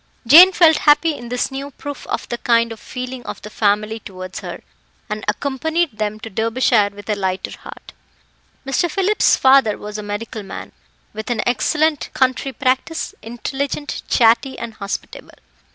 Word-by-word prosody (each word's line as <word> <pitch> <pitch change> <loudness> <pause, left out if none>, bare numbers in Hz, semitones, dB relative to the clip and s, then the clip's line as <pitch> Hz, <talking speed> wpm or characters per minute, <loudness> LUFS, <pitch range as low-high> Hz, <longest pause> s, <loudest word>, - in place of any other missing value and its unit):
Jane 335 +10 +9
felt 330 -4 +5
happy 300 +2 +4
in 240 -3 -9
this 250 +2 -1
new 275 +1 -5
proof 285 0 -8
of - - -3
the 240 - -3
kind 230 -1 +2
feeling 250 +1 -7
of - - -6
the 210 - -9
family 215 +1 0
towards 185 -2 -8
her, - - -8 0.5
and 210 0 -3
accompanied 280 +4 -1
them 215 0 -2
to 225 - -7
Derbyshire 225 0 +2
with 205 0 -13
a 215 - +1
lighter 190 -1 -3
heart. - - -12 0.7
Mr. 275 +6 0
Phillip's 390 +5 +3
father 265 -5 +4
was 210 0 -7
a - - -4
medical 210 +2 -5
man, 195 - -8 0.4
with 220 +3 -6
an 235 -3 0
excellent 300 +6 +1
country 260 +1 +1
practice, 260 +5 -1
intelligent, 270 +6 -4
chatty, 235 +2 +3
and 235 -1 -6
hospitable. 200 -1 -7
240 Hz, 155 wpm, -19 LUFS, 215-280 Hz, 0.7 s, Jane